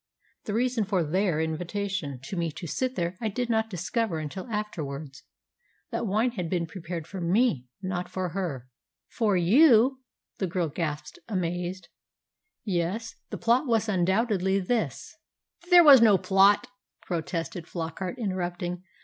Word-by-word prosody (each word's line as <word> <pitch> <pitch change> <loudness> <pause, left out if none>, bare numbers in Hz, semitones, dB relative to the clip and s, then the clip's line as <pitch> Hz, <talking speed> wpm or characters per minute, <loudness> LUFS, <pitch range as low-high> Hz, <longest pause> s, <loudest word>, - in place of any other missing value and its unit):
The 205 - -2
reason 245 -1 +1
of 170 -6 +1
their 185 -3 +1
invitation 165 -2 -3
to 160 - -6
me 170 -2 -1
to 175 - -7
sit 255 - -2
there 175 -2 -2
I 225 - 0
did 240 +3 -2
not 220 0 +1
discover 195 +1 -2
until 155 - -5
afterwards. 155 -10 -5 0.7
That - - -2
wine 220 +5 +1
had 180 -8 -4
been 175 -2 0
prepared 170 -1 -6
for 190 +2 -7
me, 175 - +2 0.2
not 180 -1 -3
for 185 -1 -3
her." 160 -9 -4 0.4
"For 210 -5 +1
you!" 250 - +5 0.4
the 190 - 0
girl 175 -2 -1
gasped, 150 -1 -4
amazed. 180 -2 -3 0.8
"Yes. 200 +4 -2 0.2
The - - -5
plot 245 +5 +2
was 225 -2 +2
undoubtedly 190 0 +1
this 220 +5 -2 0.2
" 350 - -24
"There 355 -1 +9
was 280 -5 +9
no 215 -4 +6
plot," 195 +5 +4 0.4
protested 170 0 -4
Flockart, 175 +6 -4
interrupting. 180 -4 -3
185 Hz, 145 wpm, -27 LUFS, 170-220 Hz, 0.8 s, There